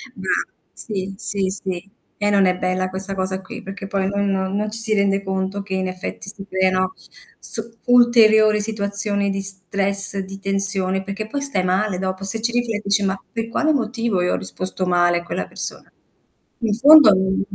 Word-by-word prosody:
Brava. -, -, -2 dB, 0.2 s
Sì, 195 Hz, -3 st, -3 dB
sì, 200 Hz, -3 st, +2 dB
sì. 190 Hz, -1 st, -5 dB, 0.3 s
E 205 Hz, 0 st, +1 dB
non 200 Hz, -1 st, +4 dB
è 180 Hz, 0 st, +2 dB
bella 185 Hz, 0 st, -1 dB
questa 190 Hz, +1 st, -4 dB
cosa 190 Hz, 0 st, -2 dB
qui, 190 Hz, -, -9 dB
perché 195 Hz, 0 st, -7 dB
poi 195 Hz, -1 st, -1 dB
noi 200 Hz, +1 st, -1 dB
non 190 Hz, 0 st, -1 dB
non 210 Hz, +1 st, -2 dB
ci 220 Hz, -, -4 dB
si 225 Hz, -1 st, +1 dB
rende 200 Hz, -1 st, +1 dB
conto 190 Hz, +1 st, -3 dB
che 195 Hz, -1 st, -6 dB
in 190 Hz, 0 st, -1 dB
effetti 185 Hz, +1 st, -6 dB
si 195 Hz, -1 st, -8 dB
creano 185 Hz, -1 st, +1 dB, 0.5 s
su 225 Hz, -1 st, -5 dB, 0.2 s
ulteriori 220 Hz, -3 st, +5 dB
situazioni 200 Hz, -1 st, 0 dB
di 195 Hz, 0 st, -2 dB
stress, 195 Hz, +1 st, +1 dB
di 195 Hz, 0 st, -7 dB
tensione, 195 Hz, -1 st, -1 dB
perché 200 Hz, +2 st, -5 dB
poi 280 Hz, +6 st, -4 dB
stai 275 Hz, -10 st, 0 dB
male 185 Hz, +2 st, 0 dB
dopo. 190 Hz, +1 st, -4 dB
Se 200 Hz, +3 st, +1 dB
ci 235 Hz, +2 st, 0 dB
rifle 240 Hz, -2 st, -1 dB
e 205 Hz, -, -3 dB
dici: 200 Hz, 0 st, +1 dB
"Ma 195 Hz, 0 st, -1 dB
per 230 Hz, -1 st, -3 dB
quale 310 Hz, +6 st, +1 dB
motivo 230 Hz, -6 st, -1 dB
io 180 Hz, -, +1 dB
ho -, -, 0 dB
risposto 185 Hz, -, -4 dB
male 175 Hz, -1 st, +2 dB
a -, -, -10 dB
quella 175 Hz, -, -4 dB
persona?" -, -, -5 dB, 0.7 s
In 225 Hz, -4 st, 0 dB
fondo 285 Hz, +2 st, +8 dB
n 190 Hz, 0 st, 0 dB
195 Hz, 190 wpm, -20 LUFS, 190-215 Hz, 0.7 s, fondo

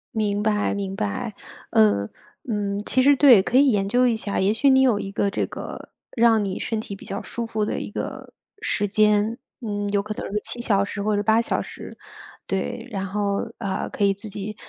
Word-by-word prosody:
明 205 Hz, -2 st, 0 dB
白 210 Hz, -1 st, +1 dB
明 195 Hz, -1 st, -3 dB
白， 100 Hz, -1 st, -3 dB, 0.4 s
呃， 100 Hz, -1 st, +3 dB, 0.4 s
嗯。 205 Hz, -1 st, -1 dB
其 260 Hz, -, +2 dB
实， 280 Hz, +1 st, +5 dB
对， 250 Hz, -9 st, +7 dB
可 250 Hz, -, +1 dB
以 280 Hz, -, +6 dB
研 195 Hz, -3 st, +1 dB
究 250 Hz, +3 st, +4 dB
一 235 Hz, -, +2 dB
下， 215 Hz, -2 st, -3 dB
也 195 Hz, +2 st, +3 dB
许 275 Hz, +5 st, +3 dB
你 265 Hz, -, +6 dB
有 245 Hz, -6 st, +4 dB
一 195 Hz, -1 st, -5 dB
个 200 Hz, -, 0 dB
这 -, -, -1 dB
个 -, -, -8 dB, 0.3 s
让 225 Hz, -3 st, +4 dB
你 190 Hz, -, -3 dB
身 225 Hz, -, -2 dB
体 205 Hz, -2 st, -6 dB
比 -, -, -13 dB
较 -, -, -4 dB
舒 235 Hz, -1 st, -5 dB
服 220 Hz, -2 st, -1 dB
的 -, -, -2 dB
一 -, -, -6 dB
个 -, -, -6 dB, 0.3 s
时 205 Hz, -, 0 dB
间， 210 Hz, +2 st, +2 dB, 0.2 s
嗯， 205 Hz, -3 st, -3 dB
有 200 Hz, 0 st, +1 dB
可 210 Hz, +1 st, -5 dB
能 -, -, -6 dB
是 210 Hz, -, 0 dB
7 240 Hz, -, -5 dB
小 200 Hz, -4 st, +2 dB
时 200 Hz, 0 st, -5 dB
或 210 Hz, 0 st, +1 dB
者 205 Hz, -, +1 dB
8 220 Hz, +2 st, +3 dB
小 -, -, -1 dB
时， -, -, -10 dB, 0.5 s
对， 230 Hz, +5 st, -3 dB
然 195 Hz, -2 st, -3 dB
后， 200 Hz, +2 st, -2 dB
呃， 195 Hz, -4 st, -3 dB
可 205 Hz, -, 0 dB
以 200 Hz, -, +3 dB
自 205 Hz, +2 st, -9 dB
己 205 Hz, +1 st, -6 dB
210 Hz, 225 characters per minute, -23 LUFS, 200-225 Hz, 0.5 s, 对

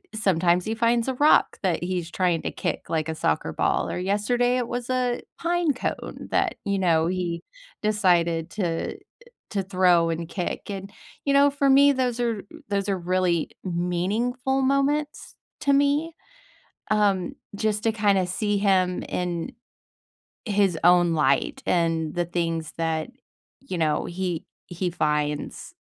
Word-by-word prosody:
sometimes 180 Hz, -4 st, +2 dB
he 220 Hz, -, -1 dB
finds 235 Hz, +1 st, +2 dB
a 260 Hz, -, -2 dB
rock 295 Hz, +4 st, +4 dB
that 180 Hz, -3 st, 0 dB
he's 175 Hz, -2 st, -2 dB
trying 175 Hz, -3 st, +1 dB
to -, -, -2 dB
kick -, -, -4 dB
like 160 Hz, -1 st, -1 dB
a 160 Hz, -, -2 dB
soccer 75 Hz, -, 0 dB
ball, -, -, 0 dB
or -, -, -3 dB
yesterday, 240 Hz, +6 st, +1 dB
it 245 Hz, -2 st, -1 dB
was 245 Hz, 0 st, -4 dB
a 250 Hz, -1 st, 0 dB, 0.2 s
pine 340 Hz, -2 st, +1 dB
cone 255 Hz, -, -5 dB
that, -, -, +1 dB
you 200 Hz, -1 st, 0 dB
know, 165 Hz, -3 st, +3 dB
he 175 Hz, -2 st, -2 dB, 0.4 s
decided 175 Hz, -6 st, +2 dB
to 175 Hz, -6 st, -2 dB, 0.5 s
to 200 Hz, -2 st, -1 dB
throw 180 Hz, -3 st, +3 dB
and 165 Hz, 0 st, -3 dB
kick, 180 Hz, +2 st, -4 dB
and, 195 Hz, 0 st, -6 dB, 0.3 s
you 280 Hz, -, +2 dB
know, 280 Hz, +1 st, +6 dB
for 280 Hz, 0 st, +1 dB
me, 280 Hz, +1 st, +7 dB
those 250 Hz, -2 st, -1 dB
are 230 Hz, -4 st, -1 dB, 0.3 s
those 200 Hz, -1 st, -1 dB
are 195 Hz, -, +1 dB
really 180 Hz, -3 st, +1 dB, 0.2 s
meaningful 210 Hz, +10 st, -1 dB
moments 275 Hz, +3 st, 0 dB, 0.3 s
to 280 Hz, -, +3 dB
me, 285 Hz, +4 st, +2 dB, 0.8 s
um, 200 Hz, -4 st, +2 dB, 0.2 s
just 210 Hz, 0 st, -1 dB
to 225 Hz, -, +3 dB
kinda 205 Hz, -4 st, +2 dB
see 205 Hz, +2 st, -1 dB
him 185 Hz, -3 st, +2 dB
in 175 Hz, -2 st, -3 dB, 1.0 s
his 200 Hz, -5 st, +2 dB
own 175 Hz, -1 st, +5 dB
light 140 Hz, -3 st, +1 dB
and 165 Hz, -3 st, +1 dB
the 175 Hz, 0 st, 0 dB
things 165 Hz, -2 st, -2 dB
that, 160 Hz, +1 st, -1 dB, 0.5 s
you 265 Hz, -8 st, -5 dB
know, 155 Hz, -2 st, +1 dB
he 175 Hz, -2 st, -3 dB, 0.2 s
he 175 Hz, 0 st, -3 dB
finds 150 Hz, -3 st, -2 dB
190 Hz, 150 wpm, -25 LUFS, 170-240 Hz, 1.0 s, me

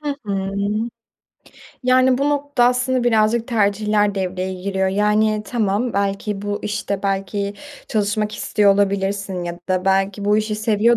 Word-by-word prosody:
Hı 295 Hz, -1 st, -2 dB
hı. 195 Hz, -1 st, -2 dB, 1.3 s
Yani, 255 Hz, 0 st, +4 dB
bu 280 Hz, -, +1 dB
noktada 285 Hz, -4 st, +2 dB
aslında 250 Hz, 0 st, 0 dB
birazcık 225 Hz, +1 st, +2 dB
tercihler 210 Hz, -1 st, +1 dB
devreye 185 Hz, -1 st, -2 dB
giriyor. 190 Hz, +1 st, -1 dB
Yani, 210 Hz, +2 st, +2 dB
tamam, 225 Hz, 0 st, 0 dB
belki, 200 Hz, 0 st, -2 dB
bu 205 Hz, 0 st, -2 dB
işte, 205 Hz, -2 st, -3 dB
belki, 200 Hz, +1 st, -2 dB, 0.3 s
çalışmak 210 Hz, 0 st, 0 dB
istiyor 205 Hz, -2 st, +3 dB
olabilirsin 195 Hz, -2 st, -1 dB
ya 175 Hz, 0 st, -5 dB
da 185 Hz, 0 st, 0 dB
belki 195 Hz, +1 st, +1 dB
bu 210 Hz, +1 st, +3 dB
işi 215 Hz, 0 st, -1 dB
seviyor 220 Hz, +2 st, +2 dB
205 Hz, 135 wpm, -20 LUFS, 195-220 Hz, 1.3 s, Yani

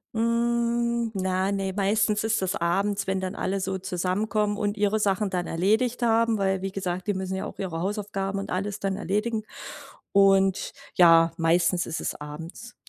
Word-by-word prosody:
Hm, 235 Hz, 0 st, +1 dB
na, 190 Hz, 0 st, 0 dB
ne, 195 Hz, -1 st, -1 dB
meistens 210 Hz, +2 st, +1 dB
ist 220 Hz, -1 st, +1 dB
das 185 Hz, -1 st, -1 dB
abends, 195 Hz, +4 st, 0 dB
wenn 190 Hz, 0 st, -1 dB
dann 185 Hz, -1 st, -4 dB
alle 195 Hz, +1 st, -1 dB
so 190 Hz, 0 st, -2 dB
zusammenkommen 205 Hz, +3 st, -1 dB
und 205 Hz, -1 st, -1 dB
ihre 210 Hz, +1 st, +1 dB
Sachen 200 Hz, 0 st, +1 dB
dann 180 Hz, -1 st, -2 dB
erledigt 220 Hz, +9 st, +1 dB
haben, 230 Hz, -1 st, +2 dB
weil 190 Hz, -1 st, 0 dB
wie 195 Hz, -, -2 dB
gesagt, 185 Hz, -2 st, -3 dB
die 205 Hz, -, +2 dB
müssen 190 Hz, 0 st, -3 dB
ja 190 Hz, -, -3 dB
auch -, -, -9 dB
ihre 175 Hz, -4 st, -3 dB
Hausaufgaben 195 Hz, 0 st, -2 dB
und 195 Hz, -, -6 dB
alles 200 Hz, +2 st, -2 dB
dann 195 Hz, -1 st, -1 dB
erledigen. 210 Hz, +3 st, -1 dB, 0.7 s
Und 195 Hz, -1 st, +3 dB, 0.2 s
ja, 165 Hz, -2 st, +6 dB
meistens 175 Hz, +2 st, +2 dB
ist 160 Hz, -, -4 dB
es -, -, -3 dB
abends. 160 Hz, +11 st, -9 dB
195 Hz, 170 wpm, -26 LUFS, 185-215 Hz, 0.7 s, ja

